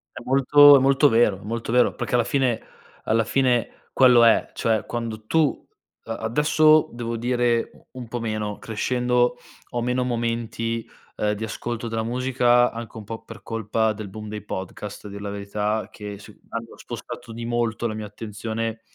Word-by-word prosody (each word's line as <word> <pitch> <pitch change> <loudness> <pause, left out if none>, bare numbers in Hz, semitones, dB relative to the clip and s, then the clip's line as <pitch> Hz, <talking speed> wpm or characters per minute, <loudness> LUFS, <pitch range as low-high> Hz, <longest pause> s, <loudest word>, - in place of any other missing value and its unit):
È - - -7
molto 140 +2 +7
è - - +4
molto 135 +2 +5
vero, 115 -5 +3
è - - -14
molto 115 +1 -4
vero, 125 0 +4
perché - - -4
alla 120 -2 +4
fine, 130 -4 +1 0.4
alla 115 0 +2
fine 125 -3 0
quello 125 -3 +6
è, 115 - +4
cioè 110 -2 0
quando 115 -2 -5
tu, 155 +2 +1 0.4
ehm 115 - -5
adesso 150 +6 +4
devo 115 -1 -4
dire 120 0 +1
u - - -22
un 120 - -8
po' 120 - -3
meno, 110 -2 -3
crescendo, 125 +2 0 0.3
ho 120 - -2
meno 125 +1 0
momenti, 115 -1 -2 0.3
ehm, 105 0 0
di 110 +2 -5
ascolto 120 +2 -4
della 115 0 -2
musica, 125 0 +2
anche 115 -1 -8
un 110 - -7
po' 110 +2 -7
per 115 0 -11
colpa 110 0 0
del 110 -1 -7
boom 105 +2 -8
dei 105 -1 -6
podcast, 100 +1 -6
a - - -7
dir 100 0 -8
la 100 0 -5
verità 105 +2 -2
che, 105 -1 -8
sì, 105 +1 -14
hanno 115 0 -6
spostato 115 - -8
di 115 +1 -6
molto 120 -1 -1
la 110 - -3
mia 110 -1 -5
attenzione, 110 +2 -5
115 Hz, 180 wpm, -24 LUFS, 110-125 Hz, 0.4 s, molto